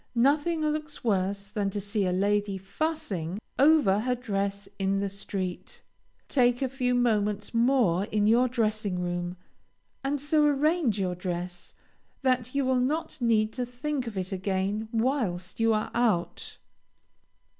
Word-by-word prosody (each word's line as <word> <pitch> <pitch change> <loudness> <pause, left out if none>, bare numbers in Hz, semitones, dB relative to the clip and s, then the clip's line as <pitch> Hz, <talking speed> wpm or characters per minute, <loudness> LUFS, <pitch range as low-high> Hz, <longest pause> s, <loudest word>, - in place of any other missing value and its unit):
Nothing 290 +7 +2
looks 305 0 -2
worse 200 -2 0
than 205 -2 -1
to 205 - -3
see 200 0 -1
a - - +1
lady 200 +1 +1
fussing 195 - -3 0.2
over 275 -9 +5
her 250 +3 0
dress 200 -4 -2
in 195 0 +1
the 200 0 -1
street. 190 -2 -5 0.4
Take 245 -1 +2
a 265 - 0
few 250 -1 0
moments 210 -4 +1
more 230 -7 +3
in 210 0 0
your 235 +4 +5
dressing 215 -5 -1
room, 175 0 -3 0.7
and 280 +1 0
so 300 +2 +2
arrange 295 - +2
your 185 -2 0
dress 180 0 -5 0.5
that 255 -1 +1
you 280 -1 +2
will 260 -1 +2
not 305 +4 -1
need 220 -2 +2
to 250 - -2
think 250 +2 -3
of 215 -4 -6
it 185 0 -3
again 195 +3 -1
whilst 225 -8 -1
you 225 0 +3
are 215 -1 0
out. 220 -8 0
215 Hz, 145 wpm, -28 LUFS, 195-255 Hz, 0.7 s, over